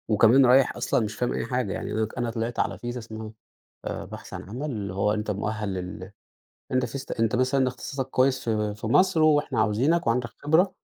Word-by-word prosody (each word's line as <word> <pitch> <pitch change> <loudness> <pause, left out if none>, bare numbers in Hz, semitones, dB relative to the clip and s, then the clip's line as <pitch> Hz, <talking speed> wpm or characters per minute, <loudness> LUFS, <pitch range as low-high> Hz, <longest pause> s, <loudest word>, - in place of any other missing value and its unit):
وكمان 115 +5 +6
رايح 130 +2 +5
أصلًا 110 - +1
مش 105 +1 -6
فاهم 125 - -1
أي - - -2
حاجة، 125 -4 -1
يعني - - -4
أنا 110 0 0
ك 110 - -12
أنا 120 -1 -1
طلعت 115 +1 -3
على - - 0
فيزا 120 +1 -5
اسمها 110 -1 -8 0.5
آآ - - -4
بحث - - -10
عن - - -6
عمل، 140 +7 -4
اللي 100 -5 -4
هو 100 +2 +1
أنت 105 0 -2
مؤهل 105 0 -3
لل 95 +1 -6 0.6
أنت 130 -1 +2
فيزت 135 +3 -6
أنت 115 +1 +1
مثلًا 130 +1 +2
اختصاصك 135 +1 -4
كويس 130 0 +2
في 105 -1 0
في 110 +1 -5
مصر 185 +7 +4
وإحنا 150 -2 +3
عاوزينك، 135 +11 +2
وعندك 120 +1 +1
خبرة، 170 +6 +2
120 Hz, 205 wpm, -26 LUFS, 105-130 Hz, 0.6 s, وكمان